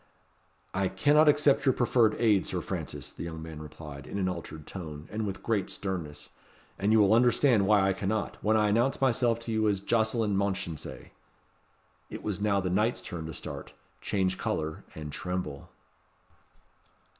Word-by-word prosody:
"I 95 0 +1
cannot 150 +8 +4
accept 145 -2 +4
your 135 -2 +4
proffered 120 -3 +3
aid, 105 -5 +3
Sir - - -2
Francis," - - -5
the - - -10
young 80 -1 -6
man 80 -1 -8
replied, 75 -2 -9
in - - -5
an 95 -2 0
altered 80 -4 -6
tone, 80 -5 -8
and 105 0 -2
with 95 -1 -5
great 110 -5 0
sternness. 85 -7 -4 0.5
"And 100 +2 +2
you 110 - +6
will 105 -1 +5
understand 120 -2 +4
why 100 -2 +5
I 95 - +2
cannot, 100 +2 -3
when 110 +1 +3
I 105 -1 +3
announce 120 +6 +2
myself 120 -3 +2
to 115 - -5
you 110 -1 +2
as 100 -2 0
Jocelyn 110 0 +1
Mounchensey." 95 -5 -3 1.0
It - - -7
was 100 -2 -3
now 100 -1 +2
the 90 -1 -1
knight's 110 +6 +1
turn 85 -4 -5
to 80 - -6
start, - - -7 0.3
change 95 -1 0
colour, 80 0 -2
and 75 -1 -6
tremble. 90 -5 -4
100 Hz, 170 wpm, -29 LUFS, 90-110 Hz, 1.0 s, you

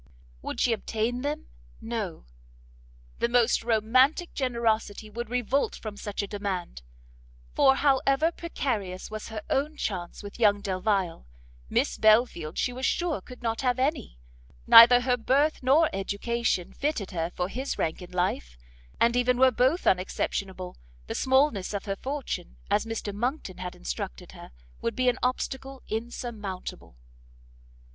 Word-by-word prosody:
Would - - -5
she 240 - +3
obtain 225 +3 -2
them? 290 +2 -3 0.3
no; 220 - -4 0.9
the 235 - +1
most 240 -1 +3
romantic 255 - +3
generosity 225 -4 -1
would 235 +1 -5
revolt 250 +3 0
from 215 -2 -7
such 205 0 -4
a - - -4
demand, 195 - -4 0.7
for 270 - +5
however 275 +3 +3
precarious 220 - -3
was 215 0 -6
her 220 -2 -6
own 300 +3 0
chance 180 -1 -4
with 205 +3 -9
young 205 -3 +4
Delvile, 190 - -1 0.4
Miss - - 0
Belfield 215 -8 +3
she 250 - 0
was 255 +1 -7
sure 345 -3 0
could 250 -1 -13
not 225 +1 -1
have 250 -2 +1
any; 265 - -1 0.5
neither 245 +2 +10
her 250 0 +1
birth 280 +6 +2
nor 285 +5 +5
education 200 0 -1
fitted 280 -10 -2
her 165 -2 -2
for 180 - -1
his 260 +7 -4
rank 160 +3 -1
in 180 - -9
life, 175 - -2 0.4
and 235 +1 +4
even 245 0 +2
were 260 0 +6
both 260 +9 +2
unexceptionable, 185 0 -1 0.3
the - - -4
smallness 260 -7 +2
of 200 - -4
her 195 -1 -2
fortune, 265 - -5
as 210 - +2
Mr 225 -2 -4
Monckton 240 -2 -3
had 180 -1 -5
instructed - - -6
her, - - -12 0.3
would 230 - -2
be 255 -1 +3
an 250 - -1
obstacle 265 +1 -3
insurmountable. 215 - -5
230 Hz, 145 wpm, -27 LUFS, 195-255 Hz, 0.9 s, neither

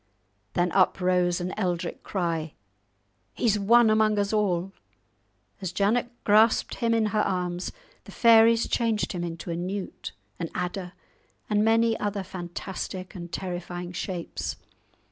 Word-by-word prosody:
Then 175 0 +1
up 190 +1 +3
rose 180 -1 +2
an 180 +1 -3
eldrich 175 -4 -2
cry, 165 -5 -2 0.8
"He's 215 -3 +2
won 225 +2 +5
among 215 -1 +3
us 205 +1 0
all!" 195 -3 +1 0.9
As 185 -3 -3
Janet 210 +6 +1
grasped 220 +2 +4
him 230 -1 +1
in 225 -1 +2
her 215 - +3
arms 180 -2 -2 0.3
the - - -11
fairies 230 0 +5
changed 225 -3 0
him 175 -2 -3
into 170 0 -5
a - - -2
newt, 185 - -5 0.3
an 165 -2 -3
adder, 180 0 -3 0.6
and 210 0 +3
many 225 +1 +3
other 205 -1 -2
fantastic 185 +1 -6
and 175 -3 -8
terrifying 175 -1 -5
shapes. 180 -1 -4
190 Hz, 135 wpm, -26 LUFS, 175-215 Hz, 0.9 s, won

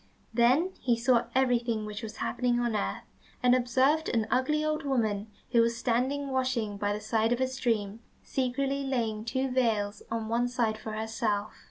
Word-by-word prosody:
Then 255 +10 +4
he 240 -2 +1
saw 240 0 +3
everything 240 -4 +1
which 210 0 -6
was 220 -1 -7
happening 245 0 0
on 240 -2 0
earth, 210 - -2 0.4
and 250 0 +6
observed 260 +5 +2
an 225 -2 +1
ugly 300 +4 +2
old 310 +1 -1
woman 220 -7 0 0.2
who 235 -2 +5
was 230 0 +1
standing 265 +4 0
washing 255 -5 0
by 205 0 -1
the 205 - -2
side 220 +1 +1
of 245 - +1
a 260 - +3
stream, 230 -5 -1 0.2
secretly 275 +2 -1
laying 230 -5 -1
two 260 +2 -1
veils 220 -5 0
on 225 -1 -2
one 235 +2 +1
side 230 -3 0
for 220 0 -6
herself. 215 -1 -2
240 Hz, 175 wpm, -29 LUFS, 220-260 Hz, 0.4 s, and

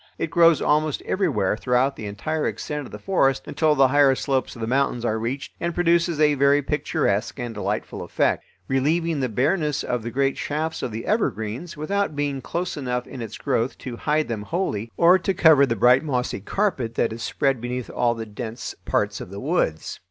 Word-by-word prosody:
It 165 - -3
grows 165 -2 +5
almost 150 0 +1
everywhere 155 - 0
throughout 125 +4 +1
the 105 - -6
entire 155 +10 -2
extent 150 -3 -4
of - - -15
the - - -7
forest 135 -9 +1
until 155 -2 +1
the 135 -2 +5
higher 140 -1 +5
slopes 135 -1 -1
of - - -11
the - - -1
mountains 125 -1 0
are 110 -1 0
reached, 125 +5 -4
and 170 0 -2
produces 170 -2 +2
a 150 -1 +5
very 140 +1 +3
picturesque 135 -8 -1
and 120 -2 -4
delightful 105 - -3
effect; - - 0 0.2
relieving 155 +4 +1
the 130 -2 0
bareness 150 - 0
of 125 -1 -2
the 115 - -5
great 135 +2 0
shafts 155 +2 -2
of 120 - -3
the 115 +2 -5
evergreens, 145 - -2
without 195 +2 -1
being 145 -2 -2
close 175 +6 -3
enough 125 -3 -2
in 130 - -8
its 110 -2 -6
growth 115 +3 -1
to 125 -2 -7
hide 150 +5 0
them 115 -3 -3
wholly, 115 - -3
or 175 +2 +6
to 190 +1 -1
cover 155 -5 +6
the 115 - 0
bright 125 +5 +5
mossy 125 -8 -2
carpet 130 - -1
that 115 - +1
is 115 - -8
spread 135 0 0
beneath 125 0 -4
all 120 -1 +1
the 115 -1 -5
dense 110 +2 -6
parts - - 0
of - - -8
the 100 +1 -7
woods. 130 - -1
135 Hz, 200 wpm, -23 LUFS, 120-155 Hz, 0.2 s, or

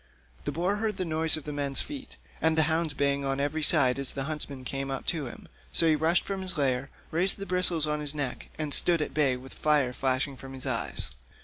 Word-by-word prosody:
The 145 - -1
boar 180 +7 0
heard 215 -2 -1
the 185 - -1
noise 160 -1 +4
of 155 - -7
the 150 - -5
men's 140 -1 0
feet, 280 -3 -5 0.2
and 160 0 +2
the 160 - +6
hounds 160 -1 0
baying 140 0 +1
on 135 0 -1
every 145 +3 -1
side 140 -4 +3
as 140 - +1
the 135 - -2
huntsmen 145 -2 -3
came 135 +1 -3
up 135 -1 -4
to 150 -5 -3
him, - - -10 0.2
so 165 - +3
he 155 - +5
rushed 160 +3 +2
from 195 -1 -3
his 185 -2 -5
lair, 135 -1 0 0.2
raised 180 +4 +3
the 195 - -5
bristles 180 -3 +2
on 150 0 -1
his 150 0 0
neck, 140 -4 -3
and 155 -2 -2
stood 170 -3 +4
at - - -6
bay 140 -4 +2
with 130 +1 -11
fire 145 -5 +2
flashing 130 +1 0
from 135 +1 -10
his 130 -1 -3
eyes. - - -2
150 Hz, 235 wpm, -28 LUFS, 135-165 Hz, 0.2 s, the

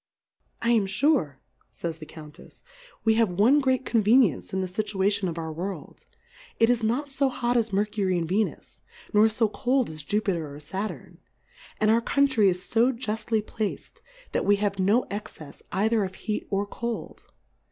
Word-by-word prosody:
I 235 - +3
am 220 -4 +3
fure, 210 - +1 0.3
fay 170 - -5
s 160 - -6
the 155 -1 -10
Count 150 -2 -12
efs^ - - -16 0.4
we 225 - +4
have 225 - +3
one 215 +11 +4
great 260 -2 +1
Convenience 220 - +3
in 190 - -1
the 185 - -2
Scituation. 200 0 0
of 170 - -6
our 160 -1 -4
World; 185 +5 -6 0.5
it 225 +1 +5
is 240 -1 +1
not 250 +6 -1
fo 270 0 +1
hot 245 -1 -1
as 225 -2 +1
Mer 200 +2 +2
cury 195 -4 -1
and 165 -1 -1
Venns^ 205 +5 -2 0.3
nor 215 +1 +6
fo 220 +1 +1
cold 250 0 0
as 155 -1 -8
Jupter 175 -6 -1
or - - -9
Saturn; 190 +8 -6 0.6
and 215 0 +3
our 230 +1 +4
Country 260 -6 +3
is 180 0 -3
fo 235 +3 +3
juftly 220 -2 -2
plac'd, 215 -2 -5 0.3
that - - 0
we 205 - +4
have 200 -1 -2
no 205 +6 +3
Excefs 160 -8 -8
either 215 +2 +2
of 190 -1 -5
Heat 215 +1 -4
or 200 0 0
Cold. 230 -3 -6
210 Hz, 180 wpm, -26 LUFS, 190-235 Hz, 0.6 s, nor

